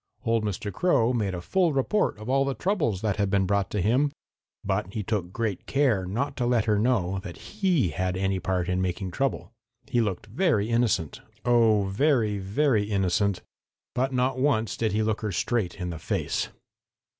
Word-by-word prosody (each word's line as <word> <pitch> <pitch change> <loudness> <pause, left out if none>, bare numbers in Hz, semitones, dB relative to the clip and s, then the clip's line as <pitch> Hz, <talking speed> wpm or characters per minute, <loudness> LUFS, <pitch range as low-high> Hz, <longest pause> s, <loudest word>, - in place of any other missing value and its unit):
Old 115 -1 +2
Mr. 105 -1 -3
Crow 130 - +2
made 100 -6 -1
a 90 - -5
full 175 - +1
report 140 - +1
of 110 +1 -9
all 135 +1 +3
the 135 -1 -2
troubles 150 - 0
that 105 -2 0
had 100 -2 +1
been 100 -1 +2
brought 100 -1 0
to 105 - -1
him, 130 +8 +2 0.5
but 95 -1 -1
he 105 - -2
took 95 -4 -2
great 110 -2 -3
care 125 -10 +2
not 135 +9 -2
to 120 -2 0
let 120 -3 +2
her 105 -2 +2
know 100 -5 +1
that 90 -3 -8
he 185 - 0
had 90 +3 -2
had - - -3
any 95 0 0
part 90 -1 -1
in 90 0 0
making 95 +1 -2
trouble. 135 +3 -2 0.3
He 120 - +1
looked 100 -4 -2
very 115 - +1
innocent, 115 -10 +1 0.2
oh, 115 -4 +4
very, 110 0 +1
very 105 +3 +1
innocent, 100 -1 0 0.5
but 130 +2 0
not 130 0 0
once 115 -7 +1
did 110 -2 0
he 110 +2 +1
look 110 0 -1
her 105 -2 -2
straight 95 0 -1
in 90 -2 -4
the 80 - -6
face. - - -2
110 Hz, 190 wpm, -26 LUFS, 95-125 Hz, 0.5 s, oh